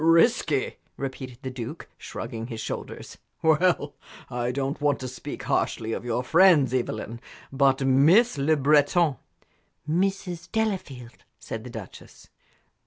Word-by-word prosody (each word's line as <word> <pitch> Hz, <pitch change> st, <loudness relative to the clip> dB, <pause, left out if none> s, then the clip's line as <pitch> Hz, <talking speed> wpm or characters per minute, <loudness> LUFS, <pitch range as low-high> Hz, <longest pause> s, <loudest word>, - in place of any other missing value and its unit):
"Risky!" 165 Hz, -, +3 dB, 0.2 s
repeated 130 Hz, -2 st, -6 dB
the 130 Hz, -, -4 dB
Duke, 120 Hz, -3 st, -7 dB
shrugging 115 Hz, 0 st, -6 dB
his 115 Hz, -3 st, -6 dB
shoulders. -, -, -6 dB, 0.2 s
"Well, 160 Hz, -2 st, +3 dB, 0.4 s
I 120 Hz, 0 st, -1 dB
don't 135 Hz, +3 st, -3 dB
want 145 Hz, -1 st, +2 dB
to 130 Hz, -, -4 dB
speak 125 Hz, -, -7 dB
harshly 115 Hz, 0 st, -1 dB
of -, -, -4 dB
your 120 Hz, +1 st, -1 dB
friends, 160 Hz, -4 st, +5 dB
Evelyn, 115 Hz, -2 st, -3 dB, 0.3 s
but 135 Hz, 0 st, +2 dB
Miss 155 Hz, -, +5 dB
Le 145 Hz, +3 st, +2 dB
Breton 145 Hz, +2 st, +3 dB, 0.4 s
" -, -, -42 dB, 0.2 s
"Mrs. 175 Hz, 0 st, -1 dB
Delafield," 185 Hz, -, -3 dB
said 115 Hz, 0 st, -7 dB
the 125 Hz, -, -8 dB
Duchess. 110 Hz, -5 st, -11 dB
140 Hz, 130 wpm, -26 LUFS, 125-165 Hz, 0.4 s, friends